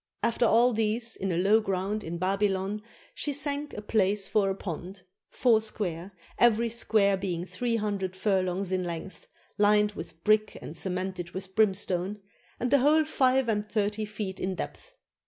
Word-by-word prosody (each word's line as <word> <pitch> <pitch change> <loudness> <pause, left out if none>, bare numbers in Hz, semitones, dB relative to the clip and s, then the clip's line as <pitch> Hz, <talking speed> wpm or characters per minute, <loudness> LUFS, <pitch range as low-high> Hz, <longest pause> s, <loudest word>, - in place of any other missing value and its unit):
After 235 +1 +2
all 240 +3 +4
these 225 +1 0
in 195 -1 -2
a 170 - 0
low 205 +5 +4
ground 195 +1 -2
in 170 +1 -4
Babylon 195 +2 0 0.3
she 295 - -3
sank 285 +1 -2
a 210 - -6
place 205 -2 +2
for 200 -2 +2
a 190 - -1
pond, 180 +1 -7 0.3
four 230 -4 +3
square, 190 -4 -4 0.3
every 235 0 +4
square 215 -3 +2
being 180 -3 -3
three 235 +4 -2
hundred 200 -4 -2
furlongs 190 -1 0
in 185 -1 0
length, 175 +2 -7 0.3
fined 210 0 +4
with 165 -3 -9
brick 215 0 +2
and 155 - -8
ce 180 - -1
mented 180 -1 -4
with 190 0 -6
brimstone, 195 -2 +1 0.4
and 245 0 -1
the 280 - +6
whole 305 +4 +4
five 260 -4 +2
and 210 -1 -1
thirty 210 0 -1
feet 205 -2 -5
in 185 0 -2
depth. - - -7
205 Hz, 170 wpm, -28 LUFS, 190-225 Hz, 0.4 s, the